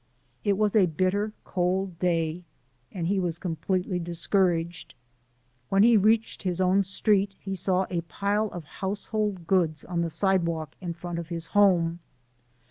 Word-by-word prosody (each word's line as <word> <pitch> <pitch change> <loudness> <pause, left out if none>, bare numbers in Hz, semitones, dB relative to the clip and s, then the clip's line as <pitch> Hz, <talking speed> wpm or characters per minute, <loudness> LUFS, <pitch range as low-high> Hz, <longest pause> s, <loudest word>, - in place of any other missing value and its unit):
It 200 -2 +2
was 210 0 +1
a 195 -4 +5
bitter 185 +6 0
cold 185 -1 -1
day, 170 -1 0 0.5
and 175 -4 -4
he 195 +3 +1
was 175 -3 -1
completely 180 +2 -2
discouraged. 170 0 0 0.7
When 195 +1 +4
he 235 +1 +6
reached 220 +2 +2
his 185 -2 -2
own 185 +1 +4
street 195 0 +1
he 195 - -5
saw 190 0 +1
a 175 -2 0
pile 200 +6 -1
of 175 -5 -7
household 200 +2 -3
goods 165 -4 +1
on 175 0 -2
the 170 - -1
sidewalk 170 -4 0
in 170 -2 -4
front 175 0 -5
of 165 -1 -7
his 165 -1 -4
home. 175 -5 +4
185 Hz, 150 wpm, -27 LUFS, 170-200 Hz, 0.7 s, he